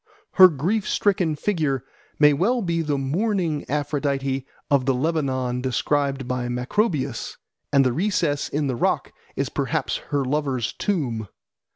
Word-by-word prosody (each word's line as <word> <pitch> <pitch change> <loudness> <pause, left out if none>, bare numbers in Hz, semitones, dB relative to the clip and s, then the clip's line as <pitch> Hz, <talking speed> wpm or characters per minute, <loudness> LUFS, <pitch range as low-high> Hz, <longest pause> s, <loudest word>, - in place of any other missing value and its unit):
Her 185 -1 +9
grief 185 +7 -1
stricken 185 -6 +1
figure 150 - -1 0.3
may 150 -1 +6
well 225 - +1
be 170 -2 0
the 150 -3 -1
mourning 165 +2 -1
Aphrodite 140 -2 -1 0.2
of 140 -2 +3
the 135 - +3
Lebanon 130 -4 -1
described 135 +1 0
by 125 -1 -2
Macrobius, 135 - -1 0.3
and 140 -2 +4
the 125 - +2
recess 165 -3 0
in 150 +1 -1
the 130 -3 -1
rock - - 0 0.2
is - - -1
perhaps - - -1
her 145 -2 0
lover's 135 -4 -1
tomb. 125 - -2
145 Hz, 140 wpm, -23 LUFS, 130-165 Hz, 0.3 s, Her